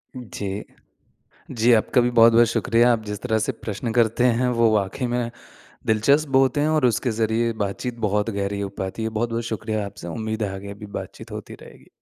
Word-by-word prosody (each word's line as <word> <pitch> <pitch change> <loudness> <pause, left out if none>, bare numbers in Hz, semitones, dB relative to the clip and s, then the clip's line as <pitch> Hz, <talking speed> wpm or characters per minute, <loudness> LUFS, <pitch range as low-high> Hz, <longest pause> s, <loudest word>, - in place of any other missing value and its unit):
जी। 105 -5 -5 0.9
जी 120 -1 +3
आपका 115 +3 +3
भी 120 - +2
बहुत-बहुत 115 0 +6
शुक्रिया, 120 +1 +3
आप 110 -1 -2
जिस 105 -1 -5
तरह 110 -3 0
से 110 - 0
प्रश्न 110 +2 -5
करते 115 0 +2 0.2
हैं 125 - +2
वो 115 -1 +5
वाक़ई 105 +5 -1
में 120 -1 -2 0.6
दिलचस्प 140 +8 +3
बहुत 135 +1 +2
हैं 150 +1 +2
और 155 -5 +3
उसके 120 +2 +1
ज़रिए 115 +1 0
बातचीत 115 +5 -4
बहुत 105 +2 0
गहरी 100 -1 -2
हो 100 - -2
पाती 95 +4 -4
है। 110 - 0
बहुत-बहुत 115 +1 -2
शुक्रिया 110 -1 -3
आपसे 95 -3 -9
उम्मीद 110 +4 -3
है 100 -2 -2
आगे 100 +1 -7
अभी 100 +1 -9
बातचीत - - -11
होती - - -7
रहेगी। - - -16
110 Hz, 190 wpm, -23 LUFS, 105-120 Hz, 0.9 s, बहुत-बहुत